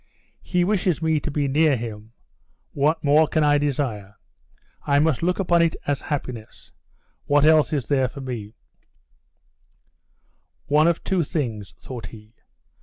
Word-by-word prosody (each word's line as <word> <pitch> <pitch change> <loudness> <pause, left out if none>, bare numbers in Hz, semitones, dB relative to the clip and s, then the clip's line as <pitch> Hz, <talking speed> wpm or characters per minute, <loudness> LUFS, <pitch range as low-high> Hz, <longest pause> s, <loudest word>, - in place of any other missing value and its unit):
"He 180 -1 0
wishes 185 -3 0
me 160 -1 +1
to 150 - -5
be 145 -1 -1
near 145 0 +3
him. 110 -1 -8 0.6
What 155 +3 0
more 150 +2 +4
can 155 0 +1
I 145 0 +3
desire? 125 -8 -3 0.7
I 140 - +1
must 150 -2 +2
look 180 +2 0
upon 175 -3 +2
it 165 -1 +1
as 145 -2 -1
happiness. 125 -7 -6 0.5
What 145 0 +3
else 155 -1 +4
is 140 -6 -1
there 135 -1 +1
for 140 +3 -10
me 120 -4 -6 1.0
" - - -44
"One 150 +2 +3
of 170 - 0
two 190 -3 0
things," 120 - -4
thought 125 -4 -8
he. 110 -1 -14
145 Hz, 150 wpm, -23 LUFS, 125-160 Hz, 1.0 s, more